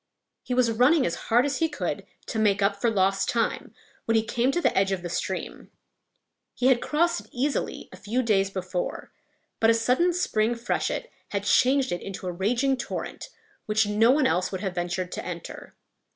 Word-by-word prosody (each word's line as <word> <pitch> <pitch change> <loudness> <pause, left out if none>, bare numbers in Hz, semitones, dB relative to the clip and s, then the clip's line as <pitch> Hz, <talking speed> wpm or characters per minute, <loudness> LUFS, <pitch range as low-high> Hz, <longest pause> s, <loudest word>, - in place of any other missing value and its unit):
He 250 - -3
was 245 -2 +3
running 255 +6 +4
as - - -1 0.2
hard 240 +3 +4
as 280 -2 -1
he 325 - +2
could 295 - -4 0.2
to 225 - -3
make 205 -2 +2
up 200 0 +2
for 235 - +3
lost 195 -2 +1
time, 230 -1 -1 0.3
when 225 - +1
he 220 - +3
came 240 +3 0
to 345 - 0
the - - +1
edge 195 0 +2
of 185 -2 -3
a - - -3
stream. - - -4 0.9
He 255 - +2
had 250 -2 +3
crossed 335 0 +1
it 210 - -20
easily 275 +4 -2
a - - -11
few 230 +6 -1
days 195 -4 +2
before; 185 -2 -4 0.5
but 225 - +4
a 230 - +5
sudden 250 +10 +2
spring 240 -10 0
freshet 245 - -2 0.2
had 200 -1 -2
changed 260 +6 +3
it 175 - -2
into 195 -1 -7
a 180 - -2
raging 240 +9 +1
torrent, 245 - -5 0.4
which 215 0 +2
no 210 +3 +3
one 275 +1 +4
else 185 -8 +1
would 190 -1 -4
have 190 -3 -2
ventured 180 +1 -3
to - - -5
enter. 175 -2 -8
225 Hz, 195 wpm, -26 LUFS, 195-255 Hz, 0.9 s, a